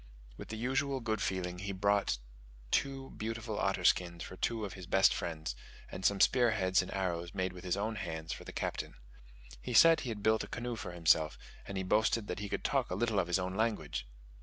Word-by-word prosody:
With - - -9
his 110 - -5
usual 135 +3 0
good 110 -3 -2
feeling 90 -2 -2
he 100 +1 -3
brought 100 -6 +2 0.5
two 135 -1 0
beautiful 115 +1 -4
otter - - 0
skins 85 -2 +2
for - - -8
two 110 +3 -1
of 95 - -6
his 90 -2 -9
best 95 +1 +5
friends, 80 -6 -4 0.4
and 95 - -6
some 100 +1 +3
spear 120 +3 +5
heads 95 -3 +3
and 90 - -7
arrows 85 -3 -2
made 95 0 -1
with 90 - -10
his 90 +1 0
own 110 +2 -2
hands 80 -5 -4
for - - -8
the - - -8
Captain. - - -3 0.7
He - - -4
said 165 -1 +8
he 125 - -4
had 105 -3 -5
built 110 0 +3
a - - -7
canoe 120 0 -4
for 110 -5 -6
himself, 80 -2 +3 0.3
and 100 - -4
he 95 - -1
boasted 110 +3 +2
that 90 - -3
he 105 -1 -4
could - - -3
talk - - +1
a 90 - -2
little 110 0 +1
of 85 - 0
his 90 - +2
own 95 0 -2
language! 105 - -1
100 Hz, 220 wpm, -33 LUFS, 90-110 Hz, 0.7 s, said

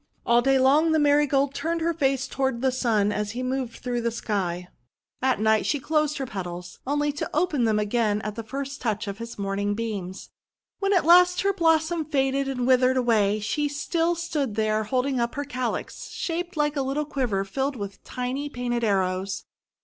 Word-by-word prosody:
All 235 0 +4
day 270 +2 +3
long 295 +5 +4
the - - +4
Marigold 285 -2 +3
turned 330 +4 -2
her 335 +1 +1
face 270 -4 0
toward 265 -3 -1
the 265 - +3
Sun 220 -5 +1
as 210 0 -2
he 250 +2 -3
moved 255 -2 -2
through 245 -1 -2
the 235 - 0
sky. 185 -6 -2 0.5
At 260 -4 +2
night 220 0 +2
she 290 - +1
closed 300 +1 0
her 270 - -2
petals, 180 -5 -7
only 290 +1 +1
to 290 - -4
open 305 -6 +2
them 220 -1 +2
again 210 0 +1
at 210 0 -3
the 230 - -5
first 275 +4 -6
touch 220 -2 -1
of 200 +1 -5
his 230 0 -7
morning 200 +1 -1
beams. 200 -5 -5 0.5
When 395 -1 0
at 370 -5 +3
last 360 +1 +6
her 395 +1 +2
blossom 325 -2 +2
faded 275 -2 0
and 250 -2 -2
withered 255 0 +4
away, 215 -4 +2
she 295 +8 0
still 330 +4 0
stood 300 -9 -2
there 215 0 +1
holding 255 +3 0
up 235 0 -1
her 285 +1 -3
calyx, 255 -3 -4
shaped 345 0 -4
like 295 0 +1
a 280 - 0
little 275 +3 -1
quiver 245 -9 -1
filled 270 +7 -2
with 200 -4 -7
tiny 255 +3 -3
painted 245 -3 -2
arrows. 190 -2 0
255 Hz, 190 wpm, -25 LUFS, 215-290 Hz, 0.5 s, last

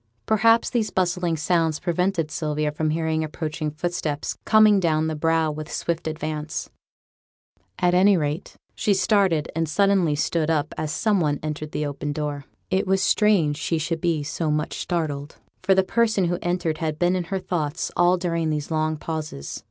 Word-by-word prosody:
Perhaps 225 +2 +3
these 230 -3 0
bustling 180 -2 0
sounds 160 0 +1
prevented 175 -2 0
Sylvia 150 -1 -1
from 155 +1 -1
hearing 160 0 0
approaching 155 0 -3
footsteps 155 -1 -3
coming 215 -2 +6
down 160 -3 +1
the 160 0 -2
brow 160 0 +1
with 150 0 -7
swift 170 -1 -2
advance; 155 -1 -4 1.1
at 180 0 +2
any 190 +2 +5
rate, 150 +2 -3 0.2
she 205 - +1
started 190 -6 +2
and 165 -1 0
suddenly 190 -2 +3
stood 155 +1 0
up 155 -2 0
as 155 -1 -3
some 205 +3 +1
one 150 -4 0
entered 155 0 -4
the 150 - -2
open 145 0 -3
door. 145 -2 -4 0.3
It 190 +1 +1
was 190 0 +2
strange 185 -9 +3
she 165 +1 -1
should 165 +1 -2
be 165 -4 0
so 155 +2 -2
much 150 +1 -1
startled, 155 -4 -3 0.3
for 190 +1 +3
the 190 - +4
person 220 -1 +2
who 175 +1 -1
entered 175 -3 -1
had 155 -2 -2
been 175 +2 +2
in 180 -2 -2
her 190 +4 -2
thoughts 165 -4 -2
all 175 +1 +4
during 170 -3 -1
those 150 0 -3
long 155 0 0
pauses. 155 - -5
160 Hz, 175 wpm, -24 LUFS, 155-180 Hz, 1.1 s, coming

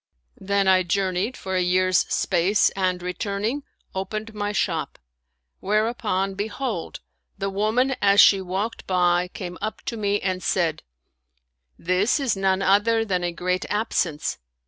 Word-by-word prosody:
Then 200 0 0
I 185 -1 +5
journeyed 190 +5 -1
for 190 -1 -4
a 185 - +2
year's 185 0 +3
space 190 +3 +2
and 185 -2 -1
returning, 200 +8 -2 0.3
opened 215 +4 -4
my 205 -1 -2
shop; 210 - -1 0.6
whereupon, 210 -2 0
behold, 205 -1 -4 0.4
the 195 0 -2
woman 220 +7 +1
as 200 0 +4
she 195 -2 +7
walked 190 +5 -4
by 180 -1 +2
came 180 -1 -8
up 215 +1 -4
to 230 - -4
me 205 -1 0
and 185 -1 -2
said, 165 -5 0 0.5
" 60 0 -49
This 200 +10 +3
is 265 -6 0
none 195 0 +1
other 225 +4 +3
than 185 -4 -1
a 175 - -1
great 180 +2 -1
absence." 180 - -1
195 Hz, 145 wpm, -24 LUFS, 180-210 Hz, 0.6 s, she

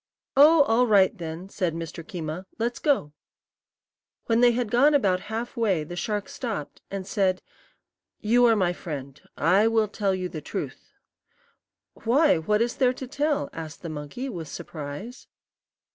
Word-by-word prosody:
"Oh, 295 +2 +7
all 245 0 +3
right, 200 -3 +4
then," 165 +1 -6
said 180 -4 -2
Mr. 165 0 -6
Keema; 170 -1 -6
"let's 235 +1 -2
go." 265 - +1 1.1
When 230 0 +2
they 245 -1 +6
had 235 -2 -2
gone 285 +5 +5
about 195 -9 +3
half 225 +2 -4
way 200 -9 +1
the 175 +4 -8
shark 205 +2 -2
stopped, 215 - -5
and 195 -1 -5
said: 190 -2 0 0.8
"You 240 +3 +4
are 225 - +5
my 180 -4 +1
friend. 140 -5 -7 0.2
I 190 +7 +4
will 225 -1 +2
tell 200 -2 -1
you 185 -1 -3
the 155 -3 -7
truth." - - -6 1.0
"Why, 270 - +3
what 210 +7 +2
is 240 - -3
there 255 -2 +3
to 260 - -7
tell?" 290 +3 -1
asked 160 -1 -8
the 165 - -4
monkey, 155 - -6
with 170 - -6
surprise. 150 - -8
205 Hz, 160 wpm, -26 LUFS, 165-240 Hz, 1.1 s, Oh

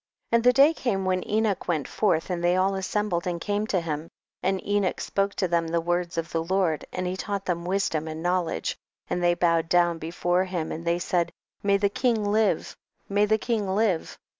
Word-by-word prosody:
22. - - +4
And 230 - +3
the 250 0 +6
day 280 +5 +6
came 200 -10 -1
when 185 -1 -1
Enoch 215 -2 0
went 160 -5 0
forth 185 -4 0
and 175 -1 -2
they 175 +1 +3
all 190 +1 +2
assem 195 +2 -1
bled 175 0 -1
and 175 -1 -2
came 205 +4 -1
to 190 - +1
him, 160 -1 -4 0.3
and 190 +1 +1
Enocii 205 -2 0
spoke 200 0 -1
to 185 - 0
them 170 -1 +1
the 170 +1 0
words 175 0 -1
of 165 -1 -2
the 165 0 0
Lord 175 -3 0
and 180 - -3
he 180 +1 -2
taught 200 0 -3
them 170 -1 -2
wisdom 180 -4 0
and 160 +1 -5
knowledge, 175 - 0 0.4
and 180 - 0
they 175 0 +3
bowed 170 -2 +2
down 175 -2 +3
before 175 +3 0
him 175 -4 -3
and 165 +2 -6
they 170 0 +2
said, 175 -1 0 0.3
may 200 0 +3
the 200 0 +2
king 225 +1 0
live, 215 +1 +1 0.3
may 205 +1 +3
the 220 +1 +3
king 220 -3 -1
live 205 -6 0
185 Hz, 215 wpm, -26 LUFS, 170-205 Hz, 0.4 s, the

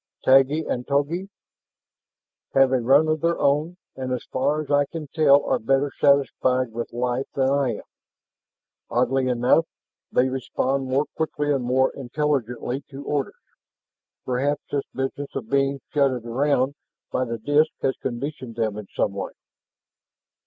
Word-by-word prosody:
"Taggi 135 +4 +5
and 125 0 -3
Togi?" 150 +7 0 1.3
"Have 135 -1 +5
a 130 - +3
run 140 +6 +5
of 155 -1 0
their 170 0 +1
own 150 +5 +1 0.2
and 130 -1 -4
as 125 - -2
far 140 +4 +1
as 150 -2 -5
I 145 0 +4
can 160 +2 -7
tell 145 -3 +5
are - - +1
better 135 +4 +1
satisfied 130 -3 +3
with 115 +1 -5
life 125 +2 -1
than 135 -1 +2
I 140 -5 +1
am. - - -9 1.1
Oddly 130 +2 +1
enough, 125 +6 +3 0.4
they 125 - +3
respond 130 +1 -1
more 135 +3 +2
quickly 150 -2 -1
and 135 -3 -1
more 130 +2 +2
intelligently 135 -2 -2
to 140 +1 -8
orders. 145 -2 -2 0.9
Perhaps 140 +3 0
this 140 -1 -1
business 135 +2 -4
of 120 -5 -5
being 140 0 +2
shunted 135 -5 +1
around 135 +2 +1 0.4
by 130 - 0
the 115 -2 -3
disks 145 +7 +2
has 130 - +1
conditioned 130 -1 -5
them 110 -3 -1
in 105 -2 -7
some - - +1
way." - - -5
135 Hz, 150 wpm, -24 LUFS, 125-145 Hz, 1.3 s, Taggi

